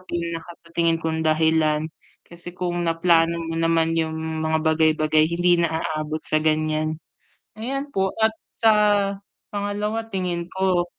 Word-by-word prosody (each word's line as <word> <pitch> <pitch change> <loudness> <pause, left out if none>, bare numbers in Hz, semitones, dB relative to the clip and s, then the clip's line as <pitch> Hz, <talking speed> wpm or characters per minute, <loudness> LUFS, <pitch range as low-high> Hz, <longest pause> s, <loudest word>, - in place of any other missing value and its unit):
pinaka 170 -2 -5 0.2
sa - - -17
tingin 170 -1 +2
kong 160 0 -2
dahilan. 155 -1 +2 0.4
Kasi 175 0 -11
kung 175 -2 -2
naplano 165 0 +3
mo 165 - -4
naman 165 0 +2
'yong 160 -1 -1 0.2
mga 160 0 +1
bagay-bagay 155 0 +3
hindi 175 0 +2
na 160 -1 0
aabot 155 0 -3
sa 155 - +1
ganiyan. 155 0 0 0.6
Ayan 275 +6 -3
po, 190 -6 0
at 220 - +5 0.2
sa 225 -1 +4 0.8
pangalawa 210 +2 -3
tingin 175 -2 -2
ko 185 -2 +1
165 Hz, 135 wpm, -23 LUFS, 160-180 Hz, 0.8 s, at